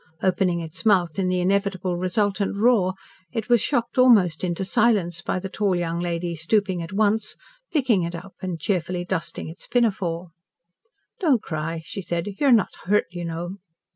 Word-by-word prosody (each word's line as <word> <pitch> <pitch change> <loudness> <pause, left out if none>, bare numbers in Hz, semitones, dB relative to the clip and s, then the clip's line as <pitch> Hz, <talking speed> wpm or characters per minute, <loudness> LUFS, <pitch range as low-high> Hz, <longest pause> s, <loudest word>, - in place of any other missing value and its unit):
Opening 180 -2 +2
its 165 +2 -7
mouth 185 -6 +3
in 190 - +1
the 180 0 +1
inevitable 190 -1 0
resultant 195 +3 0
roar, 200 -4 +3 0.4
it 225 -1 -4
was 240 -3 +5
shocked 240 -3 0
almost 200 -11 +5
into 180 +1 -1
silence 195 -6 +2
by 185 - -2
the 190 +1 -4
tall 195 -1 0
young 170 -1 -1
lady 175 0 -2
stooping 185 +2 +1
at 165 +2 -7
once, 215 +2 +1 0.4
picking 255 - +2
it 170 0 -3
up, 185 +3 -9
and 180 -3 -4
cheerfully 175 0 -1
dusting 170 -3 -3
its 160 +2 -10
pinafore. 185 -8 0 0.9
"Don't 290 - +2
cry," 160 +1 -4
she 195 - -5
said; 170 -1 -2
"you 285 - +3
are - - +6
not 225 -6 +4
hurt, 210 +3 +3
you 175 0 -5
know." 170 +3 -4
185 Hz, 170 wpm, -24 LUFS, 170-210 Hz, 0.9 s, are